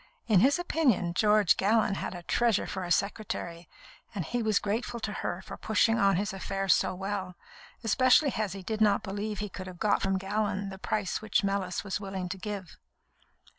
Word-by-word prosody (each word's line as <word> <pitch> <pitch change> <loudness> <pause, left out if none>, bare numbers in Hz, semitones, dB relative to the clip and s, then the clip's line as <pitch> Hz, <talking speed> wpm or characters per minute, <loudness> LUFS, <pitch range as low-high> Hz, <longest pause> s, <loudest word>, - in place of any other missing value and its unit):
In 210 -5 +4
his 270 - +4
opinion, 290 - +1
George 210 0 +4
Gallon 215 +1 +2
had 195 - -4
a 175 - -8
treasure 230 +2 +2
for 190 - -4
a 175 - -5
secretary, 175 -4 -2 0.5
and 185 -5 -2
he 245 - -2
was 215 -2 +2
grateful 225 +3 -2
to 210 -2 -3
her 185 -3 -4
for - - -8
pushing 225 +1 +2
on 195 -1 +4
his 200 +2 -1
affairs 195 0 +1
so 185 - 0
well, 190 -1 -4 0.5
especially 255 +5 +4
as 210 -4 -1
he 195 -1 -8
did 220 +2 -3
not 210 -2 +4
believe 205 +1 -4
he 210 - -3
could 185 -1 -8
have 180 -1 -9
got 205 +2 +2
from 195 0 +1
Gallon 200 0 -2
the 190 -1 -9
price 205 0 -2
which 215 -1 +1
Mellis 195 -2 -1
was 200 0 -3
willing 195 -2 -5
to 190 - -4
give. 195 -4 -6
200 Hz, 195 wpm, -29 LUFS, 190-215 Hz, 0.5 s, In